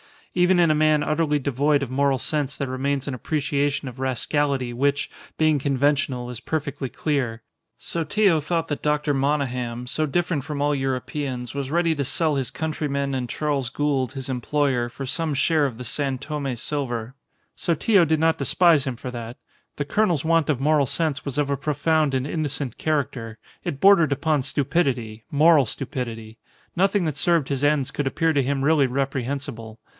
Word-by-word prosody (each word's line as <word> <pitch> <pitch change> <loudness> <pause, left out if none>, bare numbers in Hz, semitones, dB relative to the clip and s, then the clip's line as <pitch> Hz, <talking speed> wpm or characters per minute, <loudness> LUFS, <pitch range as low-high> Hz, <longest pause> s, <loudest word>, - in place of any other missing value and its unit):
Even 180 0 +3
in 170 -2 +5
a - - +4
man 155 -1 +3
utterly 155 -1 +1
devoid 140 +2 +1
of 130 - -5
moral 140 0 +2
sense 145 +2 -1
there 140 - -3
remains 135 +2 -1
an 140 - -2
appreciation 140 +1 -1
of 130 0 -8
rascality 130 0 0
which, 140 +3 0 0.3
being 155 -2 +3
conventional, 135 -2 0
is 120 - -7
perfectly 145 -1 -3
clear. 125 -6 -2 0.3
Sotillo 170 +2 +1
thought 165 +2 -2
that 145 - -3
Dr. 150 0 +1
Monygham, 125 -4 -1
so 155 +4 0
different 165 -2 -1
from 150 -2 -4
all 145 0 +2
Europeans, 130 -2 -3
was 140 -1 -3
ready 165 +1 +2
to 140 -3 -2
sell 155 +2 +1
his 135 -3 -1
countrymen 140 -3 -2
and 125 -2 -2
Charles 140 -3 -1
Gould, 135 -2 -1
his 135 -1 -6
employer, 130 -1 0
for 135 +3 -7
some 155 +3 -1
share 145 +2 +2
of 120 -4 -8
the 125 - -6
San 135 +2 -1
Tome 140 -2 -4
silver. 120 -2 -3 0.4
Sotillo 175 +3 +3
did 160 0 +1
not 160 0 +3
despise 155 +1 +4
him 130 - -2
for 125 +2 -7
that. 120 +1 -7 0.4
The 145 - -3
colonel's 175 -4 +1
want 165 -1 +2
of 135 -4 +1
moral 150 -1 +3
sense 140 0 -1
was 140 -2 -4
of 145 -1 +1
a 140 - 0
profound 150 0 +1
and 130 0 0
innocent 145 -5 -2
character. 130 -7 -2 0.3
It 140 - -4
bordered 180 -7 +6
upon 150 0 0
stupidity, 130 -6 -1
moral 150 -1 +5
stupidity. 115 -3 -5 0.4
Nothing 195 +2 +2
that 155 -4 -2
served 165 -3 +2
his 140 0 0
ends 145 -3 +2
could 145 - -2
appear 165 +4 +1
to 145 -3 +2
him 135 +1 -1
really 145 -2 +4
reprehensible. 130 -4 -3
140 Hz, 175 wpm, -24 LUFS, 130-155 Hz, 0.4 s, bordered